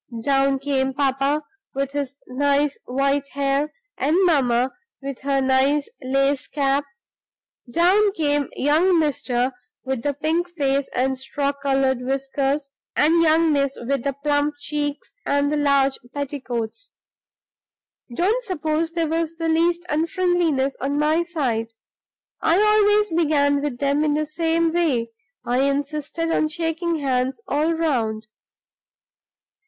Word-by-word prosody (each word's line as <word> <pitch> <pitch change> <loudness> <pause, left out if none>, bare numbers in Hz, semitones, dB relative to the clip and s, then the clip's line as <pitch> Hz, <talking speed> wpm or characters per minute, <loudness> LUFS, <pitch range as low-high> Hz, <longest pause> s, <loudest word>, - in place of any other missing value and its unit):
Down 275 +1 +2
came 270 -1 -1
papa 275 +2 +1 0.3
with 275 0 -1
his 280 -1 -3
nice 285 +2 +1
white 275 +2 0
hair, 280 +2 0 0.3
and 300 +5 +2
mamma 260 -6 +2 0.3
with 275 -1 -6
her 275 0 0
nice 265 +2 +2
lace 275 +1 0
cap; 280 0 0 0.8
down 370 - +3
came 290 -6 0
young 330 +6 +3
mister 260 -5 0 0.3
with 265 -2 -2
the 285 +2 -1
pink 325 +4 -1
face 280 -5 0
and 260 +1 0
straw 280 +1 -1
colored 270 -2 0
whiskers, 275 +2 -1 0.2
and 330 +3 +4
young 320 0 +4
miss 275 -1 0
with 270 +2 -1
the 280 -1 -1
plump 295 0 +1
cheeks 290 0 -4
and 285 0 +1
the 300 - +1
large 280 -2 +2 0.2
petticoats. 280 - -4 1.3
Don't 430 - +1
suppose 325 -4 -1
there 335 -1 0
was 325 +1 -1
the 330 -1 -1
least 340 +2 +1
unfriendliness 325 -4 +1
on 280 +2 -1
my 305 +3 +2
side; 250 -10 -2 0.7
I 335 +4 +3
always 420 -1 +4
began 290 -3 +2
with 285 -4 -3
them 280 +2 +1
in 295 -1 +1
the 305 0 0
same 325 +1 0
way 265 -10 +1 0.3
I 245 +1 +1
insisted 290 +4 -1
on 310 - +2
shaking 330 +1 -2
hands 260 - -1
all 305 +3 +1
round. 230 -9 -1
285 Hz, 130 wpm, -22 LUFS, 270-325 Hz, 1.3 s, and